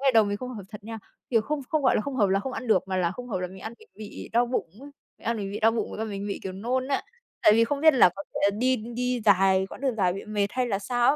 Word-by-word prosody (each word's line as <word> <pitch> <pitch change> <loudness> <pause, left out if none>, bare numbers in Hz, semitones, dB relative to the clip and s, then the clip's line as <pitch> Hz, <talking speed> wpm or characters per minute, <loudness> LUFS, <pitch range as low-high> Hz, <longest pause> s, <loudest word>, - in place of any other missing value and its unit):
ngày 270 -2 +4
đầu 220 -1 +7
mình 205 0 -2
không 255 +4 -6
hợp 205 - -7
thật 210 -1 -11
nha, 225 0 -6 0.3
kiểu, 225 -2 +4
không 295 +6 -2
không 310 -2 0
gọi 255 - +4
là - - +2
không 280 -2 -4
hợp 205 -5 +3
là 195 +1 +2
không 260 +4 -5
ăn 250 - -5
được, 205 -5 +4
mà 185 - -1
là 175 -2 +1
không 250 +4 -8
hợp 195 - -2
là 180 - -1
mình 190 - -12
ăn 220 - -6
mình - - -19
bị 215 -1 -8
đau 240 +1 +3
bụng 240 -8 -2
ấy, 285 +1 -11 0.3
mình - - -20
ăn 230 - +1
mình 200 -2 -4
bị 210 - -4
đau 225 +1 +5
bụng 230 - -2
với - - -7
cả 220 - -1
mình 200 -1 -5
bị, 200 - -3
kiểu, 190 - -4
nôn 250 +7 -2
á. 275 - 0 0.4
Tại 210 - +7
vì 230 +1 +5
không 280 +4 -2
biết 315 -2 +6
là 245 - +7
có 195 - -5
thể - - -2
là 200 - +5
đi 255 +2 +3
đi 240 +2 -2
dài 190 -1 +4
quãng - - -11
đường 265 -4 0
dài 180 -3 +2
bị 195 - -6
mệt 210 -2 0
hay 255 +1 0
là 195 -4 -1
sao 240 +5 +2
225 Hz, 335 wpm, -26 LUFS, 200-250 Hz, 0.4 s, đầu